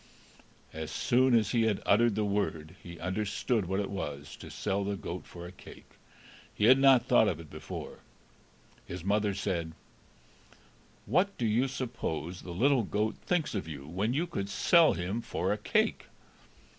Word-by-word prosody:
As 80 0 -5
soon 125 +8 +3
as 110 -3 +1
he 120 - +2
had 105 -3 +1
uttered 115 +1 +4
the 105 0 0
word, 95 -6 -2
he 85 -1 -10
understood 105 +4 -1
what 95 +2 -1
it 100 - -3
was 75 -7 -5
to - - -10
sell 100 -1 -2
the 100 +1 -2
goat 90 -1 -6
for 85 0 -9
a 90 - -8
cake; 95 - -14 0.6
he 105 - +2
had 130 +3 +7
not 135 -3 +6
thought 110 - +5
of 85 -6 -1
it 80 -3 -12
before. - - -7 0.9
His 90 -1 -6
mother 100 +1 +1
said: 90 -5 -2 1.3
"What 180 - +1
do 120 - -1
you 115 +5 +2
suppose 115 -10 -4
the - - -10
little 130 +8 +3
goat 105 +1 -1
thinks 175 -4 0
of 100 -6 -3
you, 70 -4 -7
when 100 +9 -1
you 165 +4 +1
could 100 - -4
sell 165 - +5
him 90 +7 -3
for - - -1
a - - -3
cake?" - - +1
100 Hz, 170 wpm, -30 LUFS, 90-120 Hz, 1.3 s, had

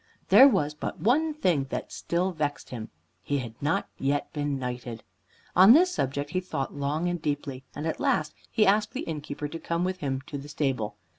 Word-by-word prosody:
There 270 - +9
was 150 - +1
but 150 - -5
one 300 +9 +3
thing 175 - +1
that - - -4
still 180 +2 -1
vexed 150 -4 -3
him. 115 -3 -6 0.3
He 145 +9 -1
had 120 -4 -5
not 145 +3 0
yet 140 +1 -1
been 145 -2 -1
knighted. 125 -2 -5 0.5
On 190 +5 +9
this 360 +5 +5
subject 140 - -2
he 185 - +1
thought 180 -7 -4
long 145 +4 -1
and 175 -2 -2
deeply, 145 -3 -3
and 150 - -4
at 160 - -2
last 150 -1 +1 0.2
he 220 -2 +3
asked 210 +2 +3
the 265 - -3
innkeeper 150 -2 -5
to 165 +3 -7
come 170 +1 -1
with 185 0 -1
him 135 -2 -2
to 140 +2 -7
the 145 +2 -10
stable. 135 -7 -1
150 Hz, 200 wpm, -27 LUFS, 140-180 Hz, 0.5 s, There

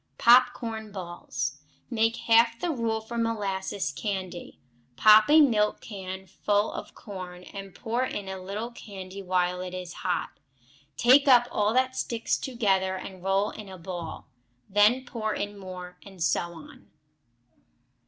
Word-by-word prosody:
Pop 245 +1 +7
corn 220 -2 -6
Balls 175 -6 -5 0.3
Make 225 0 +2
half 230 0 +5
the 350 - -1
rule 230 -5 -1
for 235 +2 -5
molasses 200 -6 -1
candy. 185 +2 -5 0.4
Pop 215 - +7
a 310 +1 +8
milk 215 -7 +3
can 190 -2 -7
full 205 +3 0
of - - -8
corn, 180 -3 -8
and 195 0 -9
pour 235 +2 -1
in 205 -6 -4
a 190 -1 -5
little 210 +5 -5
candy 195 -4 -9
while 180 -1 0
it 185 0 -6
is 180 -1 -6
hot; 180 - -2 0.6
take 265 +4 +6
up 245 -2 +7
all 210 0 +1
that 260 0 +2
sticks 230 -3 -1
together 195 -7 0
and 185 0 -8
roll 195 +2 +1
in 210 -2 -10
a 190 - -9
ball; 175 -2 -7 0.4
then 210 +6 +4
pour 220 -3 -3
in 205 0 -4
more, 180 -2 -9
and 190 -4 -7
so 170 +3 +1
on. 160 -2 -14
205 Hz, 150 wpm, -27 LUFS, 185-230 Hz, 0.6 s, a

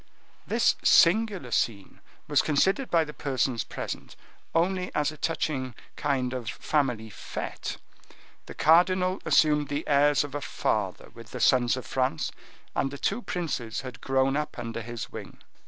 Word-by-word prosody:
This - - +3
singular 185 - +4
scene 100 -5 -1 0.3
was - - +4
considered 190 - +2
by 165 -1 +4
the 150 -1 -8
persons 130 -6 -1
present - - -6 0.4
only 180 +2 +1
as 150 0 +1
a - - -10
touching 140 -6 -2 0.2
kind 130 -3 0
of 120 -4 -4
family 125 -6 -1
fete. - - -5 0.7
The - - -9
cardinal 180 +3 +4
assumed 150 -2 +4
the 145 +3 -3
airs 145 -1 +4
of 145 -2 -8
a 145 - -3
father 105 -6 -2
with 115 -1 -12
the 125 - -6
sons 125 +1 +4
of 130 - -6
France, 135 +4 -1 0.4
and 135 - +1
the 140 - -7
two 245 - -1
princes 145 - -3
had 130 -2 -9
grown 135 0 +2
up 150 0 -3
under 115 -1 -4
his 120 0 -6
wing. - - -9
140 Hz, 155 wpm, -27 LUFS, 125-160 Hz, 0.7 s, singular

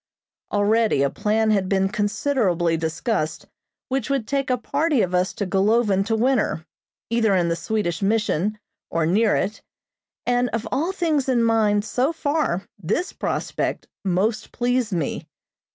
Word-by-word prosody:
Already 210 -6 +2
a 140 - +1
plan 220 +1 +1
had 195 -3 +1
been 195 -1 +2
considerably 205 -5 0
discussed 160 +1 -2 0.4
which 265 -2 -2
would 270 -6 0
take 275 -1 -1
a 250 - +2
party 280 0 +1
of 180 -1 -2
us 180 +2 +2
to 200 - -3
Golovin 200 +1 +2
to 225 - +1
winter, 230 -8 +1 0.5
either 225 -4 +3
in 175 -2 +2
the 170 - +1
Swedish 200 -3 -2
mission 210 -1 +1 0.3
or 165 -1 0
near 210 +6 +3
it, 210 +3 -2 0.6
and 245 0 +2
of 230 0 -2
all 315 +8 0
things 315 -8 0
in 240 -3 +3
mind 215 -2 +2
so 255 +7 +1
far 290 - -1 0.2
this 330 - -1
prospect - - -2 0.2
most 205 +4 0
pleased 245 -2 0
me. 165 -6 -2
215 Hz, 150 wpm, -23 LUFS, 190-245 Hz, 0.6 s, either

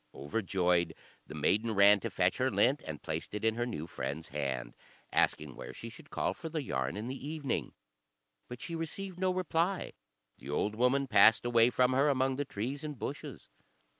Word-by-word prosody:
Overjoyed, 90 +2 0 0.3
the - - -8
maiden 110 +2 +1
ran 100 +1 +7
to - - -3
fetch - - +1
her - - +2
lint, - - +3
and - - -6
placed - - -4
it 105 - -3
in 110 - +4
her 120 +2 -2
new 80 -10 -4
friend's 75 0 -5
hand, 65 -3 -3 0.4
asking 75 -4 +1
where - - -8
she 115 - -7
should 150 +6 -14
call - - -1
for 165 -2 -7
the 155 -2 -3
yarn 65 - -2
in 110 +3 -4
the 135 +2 -6
evening; 150 -3 -3 0.7
but 125 0 -8
she 170 - -6
received 180 +3 -4
no 185 0 +2
reply; 180 0 0 0.5
the 65 - -10
old 105 +8 0
woman 125 +5 +2
passed 115 -3 +6
away 120 -1 +5
from 125 +1 +2
her 140 +3 +4
among 130 -1 +1
the 145 - -1
trees 130 +6 -4
and 150 -3 -5
bushes. - - -6
120 Hz, 190 wpm, -32 LUFS, 95-145 Hz, 0.7 s, ran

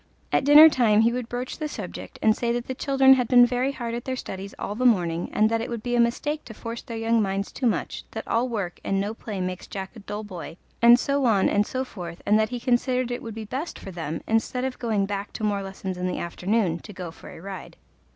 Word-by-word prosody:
At - - +2
dinner 295 +2 +10
time 225 -8 +4
he 230 +1 +3
would 245 -2 -4
broach 250 +4 -4
the 305 - -2
subject - - -7
and 220 -1 +5
say 235 0 0
the 250 +2 -5
children 270 0 +5
had 250 -3 +1
been 245 0 +7
very 250 +2 0
hard 235 -4 -5
at 240 0 -4
their 260 - -2
studies 195 -5 -7
all 205 - -4
the 240 +4 -3
morning, 175 -8 +2
and 215 - +3
that 225 0 +1
it 230 - -4
would 235 -2 -5
be 245 -1 -1
a - - +2
mistake 295 +6 0
to 220 - -10
force 230 +1 -6
their 230 - -7
young 225 0 +2
minds 195 0 -2
too 255 - -1
much, 225 - -2
that - - -7
all 240 +3 +1
work 200 -7 -3
and 195 - 0
no 205 +2 -2
play 215 -3 -6
makes 185 0 -4
Jack 195 +2 -6
a - - -9
dull 210 +1 -6
boy, 180 -4 -8 0.2
and 235 +1 +8
so 280 0 0
on 205 -5 +4
and 205 0 +2
so 260 0 -2
forth, 175 -9 -8
and 210 +1 +4
that 215 0 +1
he 245 0 -4
considered 250 +1 +1
it 245 - -3
would 225 -2 -7
be 220 -1 -6
best 270 +10 -5
for 195 - -9
them, 165 -2 -4
instead 225 +3 0
of 260 -1 -3
going 215 -4 0
back 200 0 -4
to - - -6
more 205 -1 +1
lessons 190 -1 -6
in 180 - -1
the 180 - -2
afternoon, 180 0 -1
to 210 - -11
go 180 -3 -6
for - - -13
a - - -11
ride. 190 0 -8
225 Hz, 260 wpm, -25 LUFS, 195-245 Hz, 0.2 s, dinner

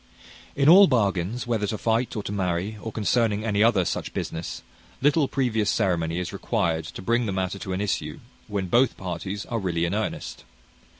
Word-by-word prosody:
In 140 0 +2
all 190 +5 +9
bargains, 105 - 0
whether 115 -4 0
to 110 - -2
fight 115 +4 0
or 105 - -3
to - - -5
marry, 95 +1 -1
or 110 - -5
concerning 110 0 +1
any 105 -2 +1
other 105 -5 +4
such - - -3
business, 80 +1 -4 0.4
little 145 +1 +3
previous 115 -7 0
ceremony 85 -5 0
is 90 -1 -3
required 80 -2 -1
to 90 - -8
bring 115 +3 +1
the - - -1
matter 95 +1 -2
to 95 - -6
an 95 - -2
issue 75 -7 -2 0.3
when 100 -3 -2
both 120 +7 +2
parties 95 +2 -5
are 115 - -2
really 85 -4 0
in 85 - -2
earnest. 110 +1 -3
105 Hz, 185 wpm, -25 LUFS, 90-115 Hz, 0.4 s, all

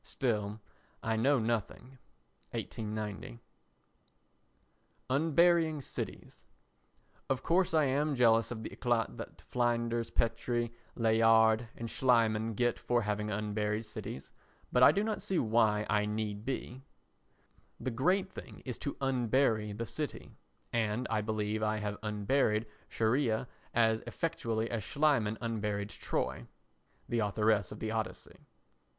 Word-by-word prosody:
Still, 105 -5 -1 0.4
I 115 0 +1
know 135 +6 +3
nothing. 120 +3 -2 0.5
[1890.] 105 - -5 1.7
Unburying 160 +1 +3
Cities - - -7 0.9
Of 135 - 0
course 175 -1 +2
I 155 - +5
am 145 +2 +1
jealous 115 -2 +4
of 115 -2 -5
the - - -6
éclat 120 -3 0
that - - -8
Flinders 120 -1 0
Petrie, 120 0 0 0.2
Layard 115 0 +4
and 115 - -4
Schliemann 115 -3 +2
get 120 +1 +1
for 120 -1 +1
having 105 0 -1
unburied 105 +1 -1
cities, 70 -9 -7 0.4
but 125 - +3
I - - +9
do 200 - 0
not 215 -1 -2
see 190 - -1
why 110 -4 +3
I 105 +1 +2
need 105 0 -3
be; 130 -1 -4 1.0
the 130 - -2
great 185 +11 +1
thing - - -10
is 125 -3 -5
to 140 - -3
unbury 125 -4 +2
the 115 - -2
city, 150 +5 -4 0.4
and 115 +1 0
I 110 -1 +2
believe 110 0 -1
I 110 0 +1
have 105 -1 -3
unburied 105 +1 +1 0.2
Scheria 115 0 +1 0.2
as 110 -1 +3
effectually 115 -9 -1
as 115 -3 -2
Schliemann 135 -8 +2
unburied 105 -3 -2
Troy. - - -3 0.6
[The 120 - 0
Authoress 105 -2 +2
of - - -8
the 110 - -2
Odyssey. 110 -1 -5
115 Hz, 125 wpm, -32 LUFS, 110-125 Hz, 1.7 s, I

